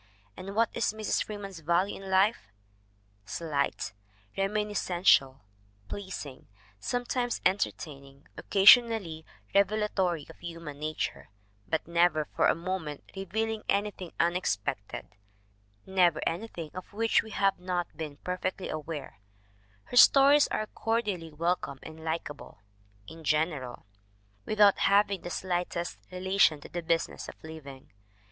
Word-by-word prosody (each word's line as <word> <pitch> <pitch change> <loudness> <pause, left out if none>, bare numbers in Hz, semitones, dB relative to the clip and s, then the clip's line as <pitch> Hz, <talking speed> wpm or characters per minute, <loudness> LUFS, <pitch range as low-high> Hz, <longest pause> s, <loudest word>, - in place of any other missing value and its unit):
And 195 +2 -8
what 230 0 +3
is - - 0
Mrs. 215 -1 0
Freeman's 200 -4 -7
value 170 +5 0
in 195 - -8
life? 190 - +3 0.8
Slight, 140 - -2 0.4
reminiscential, 195 -9 +2 0.5
pleasing, 185 -9 -7 0.3
sometimes 245 - -1
en 190 +2 +4
tertaining, 140 -5 -5
occasionally 200 -6 +5 0.3
revelatory 195 -5 +1
of - - -14
human 165 -4 -8
nature, 155 +1 -3 0.4
but 160 - -1
never 170 -2 +3
for - - +4
a - - +3
moment 165 -4 -5
revealing 220 +3 -2
anything 200 -3 -1
unex 175 - +2
pected, 100 0 -5 0.8
never 185 -2 +3
anything 170 -3 -4
of 185 -1 -8
which 225 +2 +3
we 220 - -11
have 195 -3 +1
not 180 -1 -3
been 150 -3 -6
per 180 +3 -4
fectly 185 0 -3
aware 150 - -6 0.6
her 245 - -4
stories 280 +3 +8
are 215 - -2
cordially 210 -8 -2
welcome 165 -2 -1
and 160 0 -10
likeable 160 -2 -5 0.5
(in 160 +4 -11
general) 150 -4 -1 0.6
without 210 -2 +5
having 200 -1 +3
the - - -6
slightest 175 -1 -2
re 185 - -6
lation 190 -4 +3
to - - -12
the 175 - -4
business 165 0 -1
of - - -10
living. 140 -4 -10
180 Hz, 125 wpm, -29 LUFS, 160-200 Hz, 0.8 s, stories